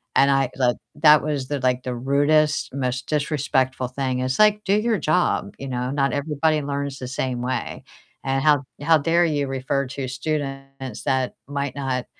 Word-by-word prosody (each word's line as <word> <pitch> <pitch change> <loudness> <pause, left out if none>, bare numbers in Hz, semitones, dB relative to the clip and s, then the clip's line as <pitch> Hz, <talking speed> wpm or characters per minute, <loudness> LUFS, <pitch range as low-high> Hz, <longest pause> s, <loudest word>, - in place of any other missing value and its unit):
And 140 - +5
I 135 -2 +2
thought 125 -2 +2 0.2
that 150 -2 +6
was 145 -3 -2
the 145 -1 -1
like 125 0 +1
the 125 -1 -3
rudest, 145 +4 +2
most 130 -2 -2
disrespectful 135 -4 0
thing. 130 -2 -2
It's 130 +4 -1
like, 210 0 +4
do 195 - +2
your 225 0 +1
job, 155 +4 +1
you 135 - -6
know? 125 0 -2
Not 140 -1 +1
everybody 150 +1 0
learns 140 -1 -3
the 125 - -5
same 130 -2 -2
way. 130 +1 -3 0.4
And 135 0 0
how 150 -2 +4 0.2
how 160 +2 +5
dare 165 +4 +3
you 145 -3 0
refer 135 +1 -1
to 135 0 -5
students 135 -2 -4
that 130 -1 0
might 140 -1 -3
not 130 -3 -2
140 Hz, 175 wpm, -23 LUFS, 130-150 Hz, 0.4 s, that